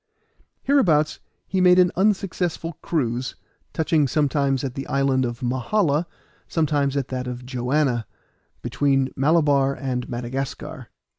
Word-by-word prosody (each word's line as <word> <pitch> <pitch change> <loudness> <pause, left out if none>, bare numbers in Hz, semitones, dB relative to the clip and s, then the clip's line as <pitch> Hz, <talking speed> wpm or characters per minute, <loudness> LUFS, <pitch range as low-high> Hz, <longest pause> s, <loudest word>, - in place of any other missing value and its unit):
Hereabouts 170 - +3 0.3
he 190 0 0
made 180 0 +6
an 180 -1 +5
unsuccessful 180 -4 0
cruise, 125 - -2 0.4
touching 155 -2 +1
sometimes 140 -1 +1
at 135 -2 -3
the 135 0 -6
island 135 -1 +1
of 120 +1 -5
Mahala, 145 - +1 0.4
sometimes 145 -3 0
at 135 -2 -2
that 130 -1 -3
of 125 0 -6
Joanna, 125 -1 0 0.6
between 135 -2 +1
Malabar 140 -2 +3
and 125 -3 -3
Madagascar. 125 +2 -5
140 Hz, 120 wpm, -23 LUFS, 130-160 Hz, 0.6 s, made